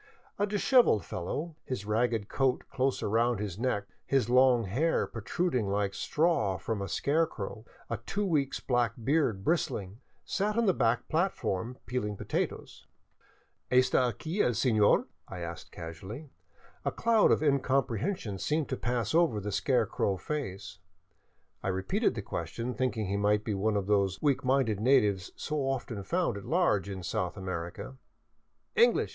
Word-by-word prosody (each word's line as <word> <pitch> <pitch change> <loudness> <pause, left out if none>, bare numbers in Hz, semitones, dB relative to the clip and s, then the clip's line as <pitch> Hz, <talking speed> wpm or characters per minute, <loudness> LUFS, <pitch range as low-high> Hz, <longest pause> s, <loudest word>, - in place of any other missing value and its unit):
A 205 - +2
dishevelled 210 - +4
fellow, 150 - -4
his 125 -6 -4
ragged 110 -1 0
coat 130 0 +1
close 135 0 0
up - - 0
around 115 +1 +2
his 100 -2 -4
neck, 115 -5 0 0.2
his 130 -4 +1
long 125 -2 +5
hair 130 - +1
protruding 120 - -1
like 100 0 0
straw 150 - +1
from 105 +3 -3
a 100 - -4
scarecrow, 125 - -1 0.2
a - - -2
two 205 +1 -3
weeks' 150 -7 0
black 120 -3 +1
beard 130 -7 +1
bristling, 105 - -1 0.3
sat 210 +2 -1
on 235 - +3
the 190 - +4
back 120 -3 +1
plat 175 +4 +1
form, 115 +7 -3
peeling 105 -5 -2
potatoes. - - -4 0.4
" - - -37
Esta 130 0 +4
aqui 160 - -2
el 120 - +2
Senor? 110 -2 +3
" - - -45
I 90 -2 -7
asked 85 0 -7
casually. 95 - -8 0.5
A - - 0
cloud 230 -2 +3
of - - +3
incomprehension 135 - 0
seemed 155 +5 0
to 130 - -2
pass 120 -1 -1
over 165 -10 +3
the 105 +1 -4
scarecrow 100 -1 +1
face. 100 -9 -5 0.8
I - - -4
repeated 95 0 0
the - - -4
question, 115 +9 -4
thinking 125 -4 -1
he 100 +1 -1
might 105 +1 +2
be 110 - -2
one 105 +2 0
of 100 - -1
those 100 -2 +1
weak, 140 -3 +1
minded 130 -5 +2
natives 105 -6 +3
so 155 - -3
often 135 -6 -2
found 170 - 0
at 100 - -9
large 155 - +2
in 95 -2 -6
South 90 +2 -2
America. 95 +6 -5 0.4
" - - -47
English 470 +1 +4
120 Hz, 160 wpm, -30 LUFS, 100-140 Hz, 0.8 s, long